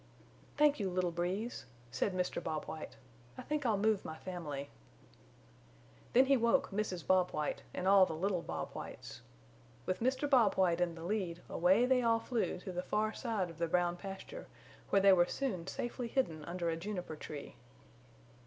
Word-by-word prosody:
"Thank 295 Hz, -2 st, +4 dB
you, 195 Hz, -2 st, 0 dB
little 180 Hz, -1 st, 0 dB
Breeze," 180 Hz, -, -3 dB, 0.3 s
said 200 Hz, -, 0 dB
Mr. 180 Hz, -1 st, -2 dB
Bob 155 Hz, -2 st, -3 dB
White, 155 Hz, -, -7 dB, 0.4 s
"I -, -, -6 dB
think 295 Hz, -3 st, -1 dB
I'll 215 Hz, -3 st, +2 dB
move 215 Hz, 0 st, +2 dB
my 160 Hz, -, -6 dB
family." 155 Hz, -7 st, -6 dB, 1.4 s
Then 255 Hz, +2 st, +7 dB
he 275 Hz, +1 st, +5 dB
woke 235 Hz, +3 st, +2 dB
Mrs. 195 Hz, -4 st, -2 dB
Bob 185 Hz, -1 st, +4 dB
White 150 Hz, -1 st, -2 dB
and 185 Hz, -, -3 dB
all 195 Hz, -1 st, +7 dB
the 160 Hz, -, -4 dB
little 185 Hz, +1 st, 0 dB
Bob 80 Hz, -, -5 dB
Whites. -, -, -8 dB, 0.6 s
With 185 Hz, -, -1 dB
Mr. 260 Hz, +4 st, +1 dB
Bob 245 Hz, -8 st, +4 dB
White 180 Hz, -2 st, +2 dB
in 170 Hz, -2 st, +1 dB
the 165 Hz, -, -9 dB
lead 180 Hz, -3 st, -2 dB
away 190 Hz, +8 st, +4 dB
they 255 Hz, 0 st, +3 dB
all 230 Hz, -1 st, +3 dB
flew 230 Hz, 0 st, -1 dB
to 185 Hz, -, -6 dB
the 180 Hz, 0 st, -2 dB
far 215 Hz, +4 st, 0 dB
side 215 Hz, -8 st, -2 dB
of 165 Hz, -, -15 dB
the 170 Hz, -, +1 dB
Brown 175 Hz, +1 st, +1 dB
Pasture 195 Hz, -, -8 dB, 0.4 s
where 195 Hz, -1 st, +3 dB
they 195 Hz, -1 st, +8 dB
were 175 Hz, -1 st, +5 dB
soon 190 Hz, -11 st, -3 dB
safely 240 Hz, +3 st, -3 dB
hidden 170 Hz, -, -1 dB
under 170 Hz, -1 st, -2 dB
a -, -, -1 dB
juniper 180 Hz, -2 st, -5 dB
tree. 150 Hz, -1 st, -8 dB
185 Hz, 180 wpm, -34 LUFS, 170-225 Hz, 1.4 s, they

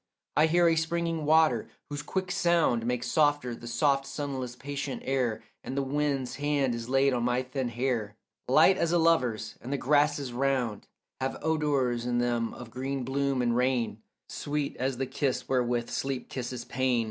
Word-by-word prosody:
I 155 Hz, +2 st, +5 dB
hear 175 Hz, +2 st, +4 dB
a 165 Hz, -, +4 dB
springing 165 Hz, 0 st, -1 dB
water, 160 Hz, +1 st, +4 dB, 0.2 s
whose 145 Hz, 0 st, -3 dB
quick 185 Hz, +3 st, -3 dB
sound 170 Hz, -11 st, +2 dB
Makes 125 Hz, 0 st, -1 dB
softer 145 Hz, -5 st, +2 dB
the 120 Hz, 0 st, -9 dB
soft 135 Hz, +3 st, +1 dB
sunless 135 Hz, -3 st, -4 dB
patient 140 Hz, +1 st, -5 dB
air, 125 Hz, -5 st, 0 dB, 0.2 s
And 135 Hz, -, -5 dB
the 140 Hz, -, +1 dB
wind's 135 Hz, -2 st, -1 dB
hand 145 Hz, -3 st, +1 dB
is 115 Hz, 0 st, -5 dB
laid 135 Hz, +1 st, +3 dB
on 120 Hz, -, 0 dB
my 125 Hz, +1 st, +1 dB
thin 130 Hz, -1 st, -3 dB
hair 120 Hz, -3 st, -2 dB, 0.3 s
Light 155 Hz, +8 st, +6 dB
as 170 Hz, -, +1 dB
a 175 Hz, -, +4 dB
lover's, 125 Hz, -10 st, +1 dB
and 125 Hz, -, -7 dB
the 140 Hz, -, 0 dB
grasses 145 Hz, -1 st, +2 dB
round 125 Hz, -5 st, -1 dB, 0.3 s
Have 130 Hz, 0 st, -2 dB
odours 140 Hz, -7 st, +1 dB
in 120 Hz, -1 st, 0 dB
them 120 Hz, -1 st, 0 dB
of 120 Hz, -2 st, -10 dB
green 130 Hz, +2 st, -3 dB
bloom 135 Hz, 0 st, 0 dB
and 120 Hz, -1 st, +1 dB
rain 125 Hz, -4 st, 0 dB, 0.3 s
Sweet 145 Hz, -1 st, -3 dB
as 130 Hz, 0 st, -1 dB
the 135 Hz, -, -1 dB
kiss 130 Hz, 0 st, -2 dB
wherewith 120 Hz, -2 st, 0 dB
sleep 135 Hz, -2 st, -3 dB
kisses 125 Hz, -1 st, -5 dB
pain. 130 Hz, -1 st, +1 dB
135 Hz, 175 wpm, -29 LUFS, 120-145 Hz, 0.3 s, Light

